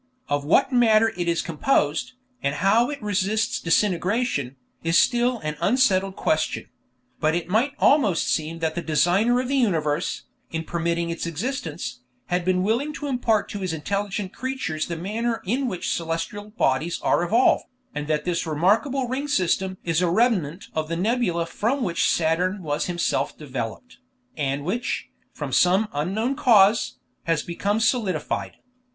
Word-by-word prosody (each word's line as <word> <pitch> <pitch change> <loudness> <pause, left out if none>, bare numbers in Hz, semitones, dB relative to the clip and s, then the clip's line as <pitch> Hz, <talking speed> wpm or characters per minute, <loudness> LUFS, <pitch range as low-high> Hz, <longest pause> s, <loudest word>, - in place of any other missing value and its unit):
Of 145 0 0
what 195 - +3
matter 225 -2 +4
it 175 -1 -2
is 170 -1 +1
composed, 165 - 0 0.3
and 140 +1 -1
how 200 - +3
it 290 -1 -5
resists 210 +2 0
disintegration, 180 - 0 0.3
is 165 0 +3
still 245 0 +3
an 155 0 -4
unsettled 195 -5 +2
question; 155 0 -1 0.5
but 155 +1 +2
it 170 -1 -2
might 235 +9 +2
almost 225 - +3
seem 160 +1 -1
that 160 -1 0
the 175 - -3
Designer 180 +10 +2
of 255 - -2
the 275 +1 0
universe, 165 - 0 0.3
in 160 0 -3
permitting 170 0 -1
its 170 0 -4
existence, 170 - -4 0.3
had 180 0 0
been 185 0 +1
willing 240 +9 0
to 295 - -6
impart 245 -6 +1
to 205 - -5
His 185 -3 -2
intelligent 200 +4 -3
creatures 255 -12 -3
the 170 - -3
manner 225 +6 -2
in 255 +7 0
which 185 -7 -2
celestial 165 +5 -4
bodies 160 - 0
are - - +3
evolved, 225 +9 +3 0.3
and 150 0 -4
that 150 -1 0
this 175 -2 -1
remarkable 220 - +1
ring 265 +4 -3
system 190 -6 0
is 165 0 +1
a 180 - +2
remnant 185 - +1
of 155 -1 -2
the 165 - -2
nebula 185 -4 0
from 235 +10 -1
which 175 -6 +1
Saturn 180 +4 +1
was 150 0 -1
himself 175 -1 -1
developed, 135 - -6 0.4
and 140 -1 -2
which, 235 +8 -2 0.2
from - - -6
some 190 +4 +4
unknown 200 - -1
cause, 220 -3 +4 0.3
has 165 -2 +1
become 200 +5 -1
solidified. 210 - -1
185 Hz, 155 wpm, -24 LUFS, 165-230 Hz, 0.5 s, matter